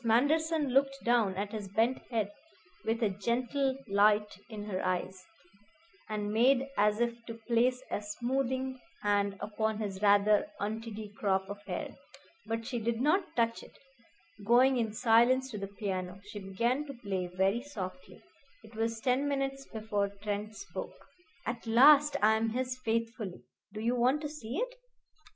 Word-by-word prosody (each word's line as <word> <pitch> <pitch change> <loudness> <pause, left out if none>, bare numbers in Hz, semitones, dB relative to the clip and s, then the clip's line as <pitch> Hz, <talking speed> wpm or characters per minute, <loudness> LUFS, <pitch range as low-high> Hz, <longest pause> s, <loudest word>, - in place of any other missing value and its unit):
Manderson 295 +6 +2
looked 275 +1 +2
down 230 -5 +2
at 200 +2 -3
his 210 -3 -5
bent 225 +6 +1
head 220 -4 -1 0.5
with 225 +1 0
a 215 - +3
gentle 250 +6 0
light 210 +1 +3
in 215 -2 -6
her 195 -3 -3
eyes, 185 +1 -2 0.9
and 210 -1 -2
made 255 +4 +4
as 210 +1 +3
if 235 0 -1
to 230 - -5
place 240 +3 +1
a - - -1
smoothing 260 +4 -2 0.2
hand 200 -1 +1
upon 215 +1 -1
his 200 -3 -4
rather 205 +4 +4
untidy 215 0 -5
crop 190 -2 +1
of 200 0 -7
hair. - - -3 0.6
But 225 +1 -2
she 240 0 -2
did 230 +1 -1
not 350 +8 +1
touch 230 -1 +1
it. - - -15 0.7
Going 250 +4 +5
in 225 -3 0
silence 245 +4 +3
to 210 - -5
the 195 - -4
piano, 190 -2 -4
she 205 0 -7
began 235 +8 0
to 275 - -7
play 195 -6 -3
very 190 +5 +1
softly. 235 -4 -8 0.4
It 220 +1 -15
was 225 0 -1
ten 260 +4 +1
minutes 275 -1 -2
before 215 -2 -1
Trent 210 +1 -3
spoke. 400 - -7 0.5
"At 235 -1 -4
last 285 +5 +7
I 220 +1 +5
am 225 +1 0
his 255 +2 -2
faithfully. 225 -4 -2 0.3
Do 215 - -7
you 235 +2 +1
want 255 +5 +2
to 300 - -3
see 260 -4 -6
it?" - - -2
225 Hz, 160 wpm, -31 LUFS, 205-255 Hz, 0.9 s, last